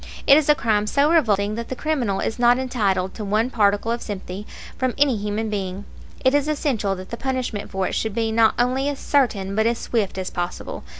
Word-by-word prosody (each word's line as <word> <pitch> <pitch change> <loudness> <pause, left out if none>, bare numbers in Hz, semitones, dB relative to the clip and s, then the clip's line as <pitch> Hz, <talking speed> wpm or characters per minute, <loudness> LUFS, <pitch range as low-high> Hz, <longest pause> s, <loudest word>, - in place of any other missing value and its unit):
It 275 - +8
is 305 0 +2
a 300 - +7
crime 210 -5 +1
so 285 +7 +2
revolting 210 - +2
that 230 +1 -5
the 260 - -3
criminal 250 -9 -1
is 225 - -3
not 240 0 +5
entitled 200 -8 0
to 215 - -6
one 215 +5 0
particle 205 0 +2
of 235 - -2
sympathy 200 0 -6 0.3
from 255 -2 -1
any 280 -3 +3
human 210 +1 -2
being. 195 -2 -4 0.4
It 260 - +5
is 290 0 +2
essential 255 -10 0
that 185 0 -10
the 235 - -4
punishment 255 -5 -3
for 190 -1 -2
it - - -4
should 220 -2 -2
be 225 -1 0
not 220 0 +4
only 255 +3 +1
as 285 - -3
certain 210 -11 0
but 220 +1 +2
as 235 0 +1
swift 215 -6 -2
as 185 -1 -3
possible. 175 0 -5
225 Hz, 220 wpm, -22 LUFS, 200-260 Hz, 0.4 s, It